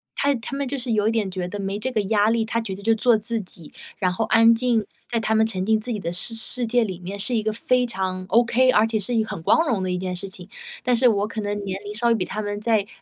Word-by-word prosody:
他 285 0 +2
他 240 +3 -6
们 280 0 -2
就 280 +2 -2
是 250 -2 -3
有 210 -1 +2
一 - - +3
点 220 -4 0
觉 185 -1 -4
得 205 +3 -6
没 195 0 -3
这 260 +5 -3
个 220 -4 +1
压 205 +1 +2
力， 225 -1 +1
他 230 +1 -1
觉 200 -4 -5
得 200 - -11
就 225 +2 +2
做 235 0 +4
自 230 +2 +1
己， 175 -4 -14 0.2
然 185 -3 +1
后 220 +5 -1
安 230 +1 +6
静， 230 -2 +1 0.2
在 235 - 0
他 220 0 0
们 220 0 +4
沉 190 -4 -2
浸 220 +1 +3
自 240 +3 -3
己 215 - -2
的 170 -3 -3
世 180 +6 -2
世 235 +2 -3
界 240 +1 +2
里 190 -5 -4
面 190 +3 -7
是 240 +5 -1
一 220 - 0
个 215 - 0
非 250 +3 +2
常 190 -5 -3
ok、 240 +2 +4
而 220 -2 +4
且 225 -1 -1
是 215 +4 -2
一 225 -2 +2
个 220 - -9
很 - - -5
光 325 - +3
荣 220 -8 0
的 185 - -1
一 180 - -1
件 185 0 -3
事 190 +2 -5
情。 185 0 -10 0.3
但 250 0 +2
是 250 +2 +4
我 205 -3 +2
可 220 0 -5
能 205 0 -3
年 190 -1 -4
龄 205 0 -6
稍 235 +3 0
微 235 - +4
比 185 - -1
他 215 +4 -4
们 205 0 -4
再， 215 -2 +1
220 Hz, 330 characters per minute, -23 LUFS, 195-235 Hz, 0.3 s, 安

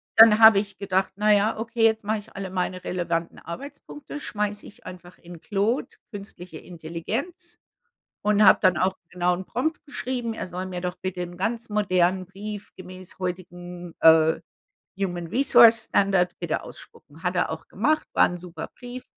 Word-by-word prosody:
Dann 220 -1 +8
habe 220 -3 +8
ich 205 -1 -6
gedacht: 190 -1 -1
„Na 210 0 +1
ja, 210 +2 +2
okay, 230 0 -2
jetzt 220 -1 +3
mache 215 0 0
ich 215 +2 -15
alle 195 -2 -5
meine 185 0 -3
relevanten 170 -2 -2
Arbeitspunkte, 285 - -9
schmeiße 210 -1 -3
ich - - -15
einfach 180 0 -11
in 170 -1 -13
Claude, 210 +5 -1 0.2
künstliche 185 -5 -9
Intelligenz“, 225 - -6 0.6
und 210 0 +3
habe 190 - +7
dann 185 -1 +4
auch 190 +1 +1 0.2
genauen 180 +1 -1
Prompt 295 - -3
geschrieben. 250 -5 -4
Er - - -5
soll 180 +1 -5
mir 180 -1 -5
doch 180 0 -3
bitte 185 -1 -3
'n 175 0 -7
ganz 225 +4 -3
modernen 185 -3 +1
Brief 205 +2 -8
gemäß 185 0 -10
heutigen, 175 -1 -6
äh, 160 0 +5 0.6
Human 175 -3 -3
Resource 235 - +6
Standard 195 -3 +2
bitte 170 -3 -2
ausspucken. 155 +3 -13
Hat 180 0 -2
er 175 - 0
auch 160 0 -7
gemacht, 310 +10 0
war - - +5
'n 180 - -6
super 175 0 -8
Brief. 245 +1 -8
190 Hz, 165 wpm, -24 LUFS, 180-220 Hz, 0.6 s, Dann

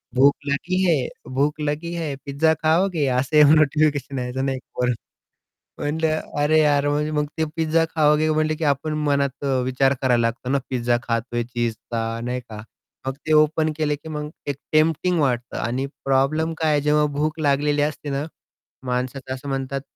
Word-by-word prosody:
भूक 140 +2 +5
लगी 170 +6 -1
है? 155 -8 +2 0.3
भूक 145 +3 0
लगी 150 +3 -2
है? 160 -4 -3
पिझ्झा 145 +3 +2
खाओगे? 165 0 +2
असं 150 +2 +5
नोटिफिकेशन 150 -3 +2
यायचं 125 +2 -2
नाही 135 -1 -1
का 130 - -16
वरून. 125 -1 +1 0.8
म्हटलं 155 +1 0 0.2
अरे 155 +2 +3
यार 145 -2 +3
म 145 0 +1 0.2
मग 150 0 +1
ते 160 - +2
पिझ्झा 165 0 +2
खाओगे? 155 0 +3
म्हंटले 155 0 +1
की 160 - -3
आपण 145 +1 0
मनात 140 -1 0
अ, - - 0 0.2
विचार 135 +1 +2
करायला 125 -2 +3
लागतो 115 +2 -2
ना 140 - +3
पिझ्झा 120 -2 +1
खातोय 120 0 -2
चीझचा, 115 -1 -3
नाही 125 +1 -2
का. 110 -3 -10 0.4
मग 135 - -1
ते 155 - +1
ओपन 155 +1 +3
केले 150 -2 0
की 150 - -12
मग 150 -1 -4 0.2
एक 140 - -1 0.2
टेम्प्टिंग 160 +3 +2
वाटतं 125 -4 -1
आणि 125 +3 -2 0.2
प्रॉब्लेम 140 +4 +1
काय 160 -1 +1
आहे 145 - +3
जेव्हा 150 +1 +3
भूक 155 +2 -1
लागलेली 145 0 +2
असते 150 0 -2
ना, 140 +1 -1 0.6
माणसाचं 130 +1 -3
असं 135 +2 -8
म्हणतात 135 0 -2
145 Hz, 170 wpm, -22 LUFS, 130-155 Hz, 0.8 s, भूक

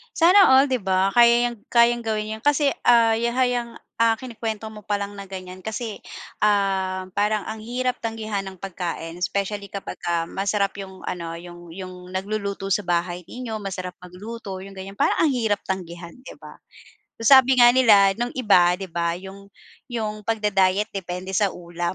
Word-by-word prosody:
Sana 365 +4 +7
all 265 +1 +5
'di 255 - +1
ba, 190 -1 +1
kaya 240 +2 +5
'yang 235 - -9 0.2
kayang 235 0 +4
gawin 215 0 -2
iyun 220 - -19
kasi, 290 -1 +3 0.2
ah, 230 -2 +5
ya 235 +1 -1
hay 250 -1 +2
'yang 235 -1 -5 0.5
kinikwento 225 -3 -5
mo 210 -2 -12
palang 205 0 -3
na 200 - -7
ganiyan 185 0 -9
kasi, 220 0 -4 0.5
um, 190 -2 +1
parang 210 0 +1
ang 220 - -5
hirap 250 +2 -2
tanggihan 220 -3 -4
ng 190 -2 -9
pagkain 170 -3 -5
specially 200 +1 -3
kapag 200 - -6
ka 170 -1 -2
masarap 200 0 0
'yung 190 -1 -9
ano, 170 -2 -5
'yung 175 0 -11
'yung 185 0 -9
nagluluto 200 0 -3
sa 195 0 0
bahay 175 0 -1
ninyo, 240 -3 -6
masarap 185 -3 -6
magluto 195 +4 -9
'yung 195 0 -11
ganiyan, 195 +1 -8
parang - - +1
ang 300 -5 +3
hirap 220 -4 +1
tanggihan 175 -2 -5
'di 255 - -13
ba? - - -14 0.6
Sabi 265 +2 +7
nga 240 -1 +7
nila 210 -6 +6
nung 240 +1 -2
iba 185 -8 +4
di 190 -1 -7
ba 170 0 -1
'yung 195 +2 -10 0.4
'yung 215 -3 -4
pag-da-diet 210 -2 +1
depende 185 -1 -5
sa 195 0 +1
ulam 175 +1 -4
200 Hz, 170 wpm, -23 LUFS, 185-230 Hz, 0.6 s, Sana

